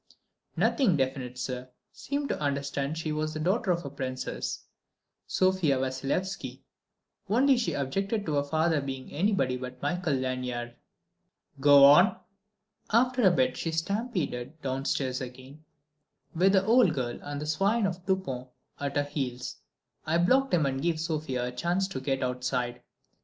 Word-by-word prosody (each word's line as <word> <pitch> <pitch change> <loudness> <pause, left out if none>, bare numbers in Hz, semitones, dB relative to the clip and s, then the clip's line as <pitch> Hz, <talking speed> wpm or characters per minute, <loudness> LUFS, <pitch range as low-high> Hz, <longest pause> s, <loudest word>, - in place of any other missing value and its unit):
"Nothing 205 - +3
definite, 130 -2 -2
sir: 125 0 -4 0.2
seemed 280 0 -3
to - - -1
understand 140 +1 -2
she 160 -1 -3
was 155 0 -2
the - - -3
daughter 190 +6 0
of 170 -6 -1
Princess 130 -1 -4 0.6
Sofia 185 -7 +2
Vassilyevski, 135 +9 -3 0.7
only 265 +6 +4
she 240 -1 -1
objected 195 - -1
to 155 - -2
her 140 -1 +2
father 160 +1 +1
being 135 -1 -6
anybody 145 -7 +1
but 125 0 -7
Michael 180 -5 0
Lanyard." 125 -2 -3 0.9
"Go 140 0 +7
on." 150 +7 +7 0.7
"After 250 +3 +3
a 195 - +7
bit 255 +8 +2
she 165 - -2
stampeded 165 - -2
downstairs 130 -1 -1
again, 130 +4 -10 0.7
with 185 +4 +3
the 190 -1 +4
old 220 -7 +5
girl 120 -3 -3
and 145 0 -5
that 150 - -4
swine 195 +8 +1
of 185 -3 -1
a - - -20
Dupont 180 -9 -2 0.3
at 140 -1 -3
her 145 - +3
heels. 135 -4 -4 0.5
I 160 +2 +2
blocked 260 +11 +3
him 165 -5 +3
and 135 -1 -1
gave 165 0 0
Sofia 155 -6 -2
a 125 - -3
chance 175 +9 0
to 155 -9 -5
get 135 0 -1
outside. 125 -1 -2
150 Hz, 150 wpm, -28 LUFS, 130-185 Hz, 0.9 s, Go